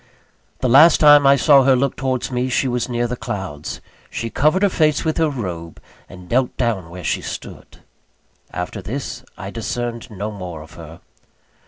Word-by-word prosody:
The 130 Hz, -, +1 dB
last 150 Hz, +7 st, +7 dB
time 145 Hz, -2 st, +7 dB
I 140 Hz, -, +7 dB
saw 140 Hz, +1 st, +5 dB
her 135 Hz, 0 st, +4 dB
look 135 Hz, +1 st, 0 dB
towards 130 Hz, -1 st, -2 dB
me, 125 Hz, +1 st, -1 dB
she 130 Hz, +1 st, +1 dB
was 125 Hz, 0 st, -2 dB
near 120 Hz, 0 st, -1 dB
the 120 Hz, +1 st, -3 dB
clouds. 95 Hz, -10 st, -6 dB, 0.3 s
She 115 Hz, -1 st, -5 dB
covered 155 Hz, +7 st, +2 dB
her 200 Hz, -, +4 dB
face 155 Hz, -4 st, +1 dB
with 160 Hz, -, 0 dB
her 160 Hz, -1 st, +3 dB
robe, 90 Hz, -, -6 dB, 0.3 s
and 90 Hz, 0 st, -12 dB
knelt 125 Hz, +3 st, 0 dB
down 110 Hz, -9 st, -1 dB
where 90 Hz, +1 st, -9 dB
she -, -, -1 dB
stood. -, -, -9 dB, 0.7 s
After 90 Hz, +3 st, -5 dB
this 125 Hz, +4 st, -5 dB
I 95 Hz, 0 st, -7 dB
discerned 120 Hz, +1 st, -4 dB
no 105 Hz, 0 st, -5 dB
more 90 Hz, -6 st, -7 dB
of 80 Hz, +1 st, -16 dB
her. 80 Hz, 0 st, -12 dB
120 Hz, 180 wpm, -20 LUFS, 95-135 Hz, 0.7 s, last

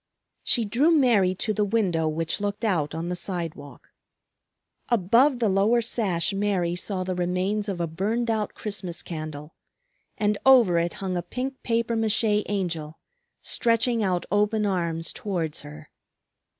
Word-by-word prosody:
She 235 Hz, -3 st, +2 dB
drew 240 Hz, +10 st, +2 dB
Mary 235 Hz, -, +4 dB
to 215 Hz, +3 st, -2 dB
the 210 Hz, -, +1 dB
window 195 Hz, -7 st, +1 dB
which 160 Hz, +4 st, -1 dB
looked 205 Hz, +2 st, -2 dB
out 160 Hz, -8 st, 0 dB
on 165 Hz, +2 st, -3 dB
the 180 Hz, -, -2 dB
sidewalk. 170 Hz, -6 st, -6 dB, 1.0 s
Above 235 Hz, +6 st, +4 dB
the 235 Hz, -2 st, +1 dB
lower 200 Hz, +5 st, +3 dB
sash 205 Hz, -6 st, 0 dB
Mary 195 Hz, -4 st, 0 dB
saw 185 Hz, +1 st, -2 dB
the 185 Hz, 0 st, -2 dB
remains 185 Hz, +4 st, -1 dB
of 190 Hz, -3 st, -3 dB
a 170 Hz, -, 0 dB
burned 215 Hz, +9 st, -1 dB
out 215 Hz, -2 st, -2 dB
Christmas 190 Hz, -5 st, -4 dB
candle; 155 Hz, -2 st, -7 dB, 0.6 s
and 210 Hz, -1 st, 0 dB
over 240 Hz, -10 st, +6 dB
it 170 Hz, +1 st, -1 dB
hung 190 Hz, -2 st, -4 dB
a -, -, -1 dB
pink 255 Hz, +9 st, -5 dB
papier 230 Hz, 0 st, 0 dB
mâché 220 Hz, -1 st, +2 dB
Angel 170 Hz, -6 st, -3 dB, 0.5 s
stretching 230 Hz, 0 st, +1 dB
out 185 Hz, -3 st, 0 dB
open 210 Hz, +1 st, +2 dB
arms 170 Hz, -4 st, -1 dB
towards 170 Hz, -7 st, -3 dB
her. 75 Hz, 0 st, -12 dB
195 Hz, 150 wpm, -25 LUFS, 175-225 Hz, 1.0 s, over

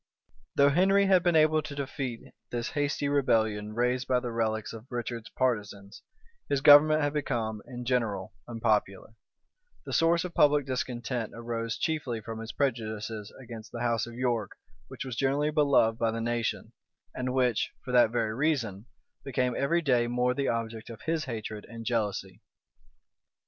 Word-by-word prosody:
Though 140 Hz, 0 st, +6 dB
Henry 195 Hz, +6 st, +4 dB
had 190 Hz, -2 st, +5 dB
been 175 Hz, -1 st, +2 dB
able 155 Hz, 0 st, +4 dB
to 145 Hz, -, -8 dB
defeat 135 Hz, -4 st, -5 dB, 0.2 s
this 120 Hz, -1 st, -3 dB
hasty 145 Hz, 0 st, -1 dB
rebellion 110 Hz, -7 st, +1 dB
raised 125 Hz, +2 st, 0 dB
by 125 Hz, -1 st, +3 dB
the 125 Hz, -1 st, -5 dB
relics 110 Hz, -2 st, -1 dB
of 115 Hz, +2 st, -10 dB
Richard's 120 Hz, -2 st, -4 dB
partisans, 105 Hz, -5 st, -2 dB, 0.5 s
his 140 Hz, -, +2 dB
government 155 Hz, +1 st, +7 dB
was 145 Hz, 0 st, 0 dB
become 115 Hz, -7 st, -2 dB
in 125 Hz, -2 st, -7 dB
general 115 Hz, -7 st, -1 dB
unpopular: 110 Hz, -3 st, -1 dB, 0.7 s
the -, -, -6 dB
source 165 Hz, +1 st, +3 dB
of 180 Hz, -2 st, -6 dB
public 145 Hz, -1 st, +4 dB
discontent 125 Hz, -3 st, -3 dB
arose 115 Hz, 0 st, -3 dB
chiefly 145 Hz, -8 st, -2 dB
from 110 Hz, +1 st, -7 dB
his 115 Hz, 0 st, -6 dB
prejudices 110 Hz, -5 st, -3 dB
against 115 Hz, -4 st, -10 dB
the 120 Hz, -, -6 dB
house 115 Hz, -1 st, 0 dB
of 120 Hz, -, -9 dB
York 120 Hz, -3 st, -1 dB, 0.3 s
which 135 Hz, +1 st, -7 dB
was 130 Hz, -3 st, -5 dB
generally 140 Hz, +4 st, +1 dB
beloved 140 Hz, -7 st, +3 dB
by 115 Hz, -, +2 dB
the 115 Hz, +1 st, -2 dB
nation, 115 Hz, 0 st, -2 dB, 0.4 s
and 125 Hz, 0 st, -2 dB
which, 125 Hz, -4 st, +2 dB, 0.2 s
for 130 Hz, -, -4 dB
that 120 Hz, -2 st, +5 dB
very 115 Hz, -2 st, -1 dB
reason, 120 Hz, -7 st, -1 dB, 0.4 s
became 125 Hz, -2 st, 0 dB
every 170 Hz, +5 st, +1 dB
day 125 Hz, -5 st, +3 dB
more 125 Hz, +1 st, +1 dB
the 140 Hz, +1 st, -1 dB
object 115 Hz, -1 st, -3 dB
of 115 Hz, -2 st, -9 dB
his 160 Hz, -1 st, -1 dB
hatred 110 Hz, -3 st, -5 dB
and 115 Hz, -1 st, -8 dB
jealousy. 105 Hz, -5 st, -2 dB
120 Hz, 160 wpm, -29 LUFS, 115-140 Hz, 0.7 s, government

